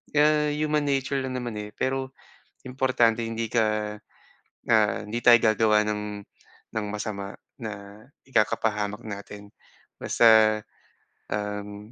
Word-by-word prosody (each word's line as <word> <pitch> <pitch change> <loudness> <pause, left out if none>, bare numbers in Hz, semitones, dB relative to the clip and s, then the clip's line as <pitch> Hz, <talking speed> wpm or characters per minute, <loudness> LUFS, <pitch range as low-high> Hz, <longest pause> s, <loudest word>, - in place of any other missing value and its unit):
Kaya, 150 0 +3
human 150 -1 0
nature 135 0 0
lang 130 -1 -4
naman, 120 -4 -4
eh, 105 0 -8
pero 130 0 -2 0.5
importante 120 -3 +2
hindi 115 0 -3
ka, 105 -2 0 0.7
ah, 110 -2 +4
hindi 120 +3 -4
tayo 120 0 +8
gagawa 110 -1 +3
ng 105 0 -2 0.7
ng 110 -2 -2
masama 100 -2 -5 0.3
na 105 -1 -8 0.2
ikakapahamak 105 -2 0
natin 100 0 -9 0.5
basta, 110 -2 +5 0.7
um, 105 0 -5
110 Hz, 110 wpm, -26 LUFS, 105-125 Hz, 0.7 s, tayo